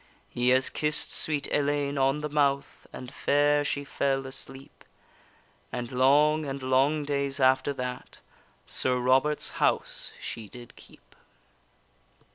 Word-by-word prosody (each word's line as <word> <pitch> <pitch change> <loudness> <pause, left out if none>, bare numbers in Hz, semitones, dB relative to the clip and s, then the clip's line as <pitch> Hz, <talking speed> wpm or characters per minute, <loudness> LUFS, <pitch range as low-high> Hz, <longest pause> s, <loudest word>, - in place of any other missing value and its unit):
He 125 +1 0
has 130 +1 +4
kiss'd 150 0 0
sweet 150 -3 -1
Ellayne 145 0 0
on 135 +2 +1
the 150 - -3
mouth, 140 -2 -1
And 130 +1 -9
fair 145 +1 +2
she 145 0 -2
fell 135 -1 -1
asleep, 135 0 -8 0.9
And 120 -1 -5
long 145 +4 +3
and 135 -2 -5
long 135 +4 +2
days 140 -1 -2
after 130 +1 +3
that 125 -1 -6 0.5
Sir 130 -1 0
Robert's 130 +4 +2
house - - 0
she 110 -3 -7
did 120 +1 -13
keep. - - -18
140 Hz, 125 wpm, -27 LUFS, 130-145 Hz, 0.9 s, has